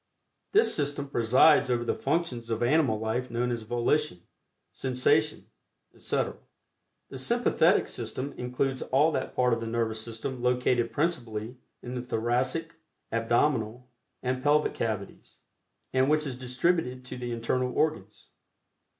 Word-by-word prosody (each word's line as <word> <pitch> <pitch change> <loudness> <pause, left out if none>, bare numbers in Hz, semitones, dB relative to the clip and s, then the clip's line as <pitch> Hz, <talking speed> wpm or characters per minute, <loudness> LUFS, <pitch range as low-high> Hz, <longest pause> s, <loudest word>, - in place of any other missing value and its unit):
This 425 +3 +4
system 145 -1 -2
presides 130 +5 +5
over 120 -1 +1
the - - 0
functions 135 -6 -2
of 115 0 -1
animal 130 -3 +3
life 110 +4 -2
known 120 +1 -1
as 120 -1 -2
volition, 120 - 0 0.5
sensation, 130 -1 +1 0.5
etc. - - -2 0.7
The - - -6
Sympathetic - - +3
System 140 +2 -4
includes 130 +1 -2
all 145 +5 +3
that - - -3
part 125 -1 +3
of 115 - 0
the 115 - -4
Nervous 115 -1 -1
System 115 +3 -5
located 125 -1 +1
principally 120 -7 -2 0.3
in 125 - -6
the 125 - -3
thoracic, 125 +8 -1 0.3
abdominal 120 +1 0 0.3
and 130 0 -1
pelvic 150 +2 +3
cavities, 110 -3 -4 0.6
and 130 +1 +3
which 155 0 +2
is 135 -3 -3
distributed 130 +1 -1
to - - -7
the 125 -1 -5
internal 125 +2 -1
organs. 110 -10 -2
125 Hz, 135 wpm, -28 LUFS, 115-140 Hz, 0.7 s, presides